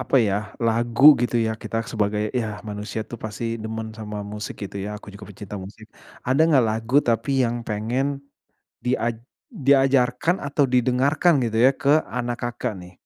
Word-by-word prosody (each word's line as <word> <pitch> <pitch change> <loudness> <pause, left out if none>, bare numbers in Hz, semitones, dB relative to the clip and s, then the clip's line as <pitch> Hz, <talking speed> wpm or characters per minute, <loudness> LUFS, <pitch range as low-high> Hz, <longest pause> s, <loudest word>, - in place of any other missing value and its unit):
apa 130 - +1
ya, 105 -6 +3 0.3
lagu 115 +3 +1 0.2
gitu 120 0 0
ya 110 -1 +1
kita - - -4 0.2
sebagai 105 -1 -1
yah, 110 -4 -2
manusia 105 +1 -5
itu 120 - -10
pasti 110 +1 -5 0.2
demen 110 0 -5
sama 105 -1 -6
musik, 105 0 -5
gitu 100 - -8
ya. 105 +1 -5
Aku 100 -1 -12
juga 100 +1 -11
pecinta 105 0 -8
musik. 105 +3 -11 0.4
Ada 130 +4 +1
nggak 135 -6 +4
lagu, 115 +5 -1
tapi 115 +2 0
yang 120 0 -2
pengen 130 +6 -2 0.6
diaj 120 -2 0 0.3
diajarkan 135 - +2
atau 140 0 +1
didengarkan 130 +7 +3
gitu 110 -1 -2
ya, 130 - +8
ke 145 +3 +2
anak 120 0 -2
Kakak, 120 -2 -3
nih? 90 0 -12
115 Hz, 165 wpm, -23 LUFS, 105-130 Hz, 0.6 s, ya